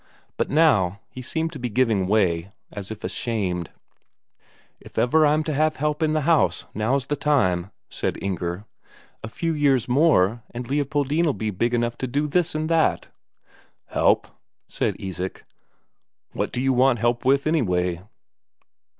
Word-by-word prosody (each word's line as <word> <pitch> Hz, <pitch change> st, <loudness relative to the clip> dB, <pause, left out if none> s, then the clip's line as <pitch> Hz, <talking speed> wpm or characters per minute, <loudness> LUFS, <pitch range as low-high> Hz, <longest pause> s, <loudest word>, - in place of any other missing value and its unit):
But -, -, -1 dB
now, 105 Hz, -, +3 dB
he 130 Hz, -, -8 dB
seemed 160 Hz, +6 st, -2 dB
to 145 Hz, -, -7 dB
be 125 Hz, 0 st, -3 dB
giving 110 Hz, -5 st, +1 dB
way, 95 Hz, -3 st, +1 dB, 0.2 s
as 100 Hz, -2 st, -7 dB
if 110 Hz, 0 st, -8 dB
ashamed. 95 Hz, -8 st, -2 dB, 1.1 s
"If -, -, -16 dB
ever 135 Hz, +7 st, +4 dB
I'm 155 Hz, +1 st, +2 dB
to 155 Hz, -, -2 dB
have 155 Hz, +2 st, +1 dB
help 150 Hz, +2 st, -1 dB
in 155 Hz, -1 st, +2 dB
the 155 Hz, -, +1 dB
house, 160 Hz, +1 st, +2 dB
now's 125 Hz, +5 st, 0 dB
the 145 Hz, -, -1 dB
time," 100 Hz, -12 st, +1 dB, 0.2 s
said -, -, -3 dB
Inger. 90 Hz, 0 st, -3 dB, 0.6 s
"A -, -, -4 dB
few 165 Hz, +7 st, -2 dB
years 140 Hz, -5 st, +2 dB
more, 120 Hz, -, +3 dB
and 120 Hz, 0 st, -7 dB
Leopoldine'll 145 Hz, +3 st, 0 dB
be 110 Hz, -1 st, -2 dB
big 120 Hz, +5 st, 0 dB
enough 120 Hz, 0 st, -1 dB
to 130 Hz, -, -2 dB
do 140 Hz, +4 st, 0 dB
this 170 Hz, +2 st, 0 dB
and 155 Hz, +1 st, -1 dB
that." 165 Hz, -1 st, +1 dB, 0.8 s
"Help?" -, -, +2 dB, 0.4 s
said -, -, -1 dB
Isak. 95 Hz, -1 st, -6 dB, 0.9 s
"What -, -, -3 dB
do 125 Hz, -, -2 dB
you 135 Hz, 0 st, +2 dB
want 130 Hz, 0 st, +4 dB
help 120 Hz, +2 st, 0 dB
with, 140 Hz, +2 st, +3 dB
anyway?" 90 Hz, -, 0 dB
125 Hz, 155 wpm, -23 LUFS, 100-150 Hz, 1.1 s, ever